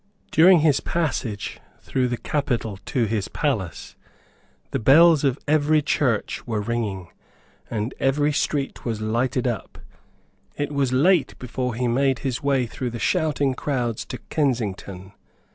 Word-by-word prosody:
During 175 +1 +6
his 150 -3 +3
passage 135 -11 -2 0.2
through 130 -2 -1
the 120 -1 -2
capital 120 -9 -2
to 125 -5 +1
his 105 -2 -1
palace, 110 - -3 0.8
the - - -1
bells 155 +6 +6
of 135 -2 +2
every 150 0 +3
church 125 -7 0
were 110 -3 -1
ringing, 105 -5 -3 0.6
and 110 +2 -3
every 145 +2 +2
street 140 -1 -1
was 115 -3 -2
lighted 120 +4 0
up. 120 -4 -3 0.8
It 145 0 -3
was 140 -3 0
late 155 +5 +3
before 125 -1 -3
he 125 +1 -1
made 135 +2 +2
his 130 -3 -1
way 140 -3 +1
through 125 +2 -4
the 120 - -6
shouting 145 -2 +1
crowds 125 -5 -2
to - - -6
Kensington. 100 - -2
130 Hz, 140 wpm, -23 LUFS, 115-145 Hz, 0.8 s, During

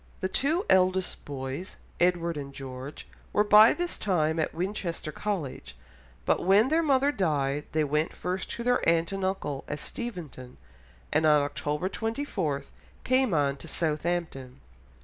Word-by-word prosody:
The 185 - -1
two 310 - 0
eldest 185 0 +2
boys, 140 +5 -5 0.2
Edward 175 -1 +2
and 140 -1 -6
George, 135 +1 -8 0.2
were 210 - +3
by 210 +2 +8
this 350 0 -3
time 160 -5 +1
at 155 - 0
Winchester 175 -3 -3
College, 155 - -4 0.5
but - - +2
when 200 +7 +5
their 320 +2 +3
mother 280 -2 +3
died 150 - 0
they 155 0 +1
went 150 +2 0
first 185 +1 -3
to 235 - -5
their 245 +1 +2
aunt 165 +1 +2
and 195 -1 -3
uncle 170 -8 -2
at 145 - -3
Steventon, 155 - -7 0.6
and 155 +1 +3
on 150 -1 +5
October 150 +3 -2
24 200 - -2 0.4
came 255 -2 +2
on 140 -3 +1
to 165 - -11
Southampton. 155 - -2
170 Hz, 150 wpm, -28 LUFS, 145-205 Hz, 0.6 s, by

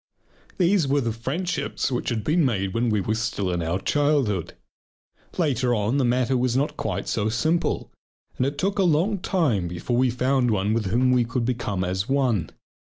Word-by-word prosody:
These 180 -3 +3
were 135 -4 +1
friendships 150 +7 -2
which 125 - -1
had 115 -3 -2
been 160 +7 +2
made 100 -8 0
when 120 +1 +1
we 105 -2 +1
were 110 - -1
still 110 -4 -2
in 85 -1 -1
our 85 +3 -1
childhood. 140 - 0 0.8
Later 130 -7 +1
on 110 +5 0
the 140 - +2
matter 125 +1 +1
was 125 0 +1
not 145 +3 0
quite 100 -2 -3
so 110 -1 0
simple, 160 +10 0 0.5
and 130 - +1
it 140 +1 -4
took 195 +4 -1
a - - +4
long 180 +5 +2
time 145 - 0
before 90 +8 -2
we 130 +1 +3
found 125 +1 +1
one 105 0 +1
with 110 -3 0
whom 125 +6 +2
we 125 -1 +4
could 115 +1 -2
become 115 -6 -2
as 95 +5 -2
one. 125 - +1
125 Hz, 185 wpm, -24 LUFS, 105-140 Hz, 0.8 s, a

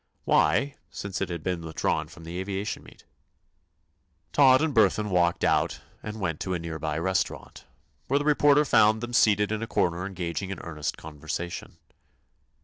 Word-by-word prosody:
Why, 140 0 +2
since 100 0 -5
it 95 - -1
had 85 -3 -5
been 90 -2 -2
withdrawn 80 -1 -1
from 85 - -14
the 85 +2 -6
aviation 95 +2 -3
meet? - - -17 1.3
Todd 130 -2 +6
and 160 -2 0
Burthon 105 -2 +3
walked 85 -1 +2
out - - +1 0.2
and 110 0 -6
went 80 -6 -2
to 95 -1 -2
a - - -2
near 80 -1 -5
by 75 -1 -2
restaurant, 95 +3 -2 0.4
where 140 - +2
the 145 - -1
reporter 145 0 +4
found 110 -3 +4
them 120 0 -5
seated 105 -3 +4
in 110 0 -2
a 115 - -3
corner 90 -2 0
engaged 90 -3 -4
in 95 0 -5
earnest 75 -3 -4
conversation. 80 +3 -6
95 Hz, 165 wpm, -27 LUFS, 85-110 Hz, 1.3 s, Todd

